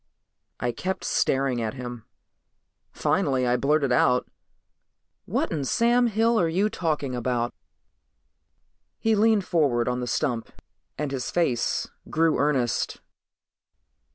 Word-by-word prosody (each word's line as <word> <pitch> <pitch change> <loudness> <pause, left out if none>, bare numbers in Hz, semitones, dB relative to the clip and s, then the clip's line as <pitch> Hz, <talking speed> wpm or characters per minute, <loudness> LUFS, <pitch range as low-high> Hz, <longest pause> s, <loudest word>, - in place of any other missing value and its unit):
I 120 0 0
kept 185 +11 -4
staring 135 -3 +1
at 110 +3 -3
him. 125 -3 -7 0.9
Finally 130 -2 +1
I 120 0 +2
blurted 140 0 +1
out, 125 0 +3 1.0
"What - - -1
in 150 -4 -1
Sam 240 - +3
Hill 225 +1 +2
are 170 - +2
you 195 +6 +1
talking 150 -6 -2
about?" 120 -1 -1 1.4
He 225 - +1
leaned 215 -2 +3
forward 135 -10 +1
on 125 0 0
the 125 - -3
stump 120 0 -1 0.5
and 150 -1 -2
his 130 -2 -3
face 135 -10 0 0.2
grew 160 0 +2
earnest. 135 -5 0
140 Hz, 120 wpm, -25 LUFS, 125-175 Hz, 1.4 s, out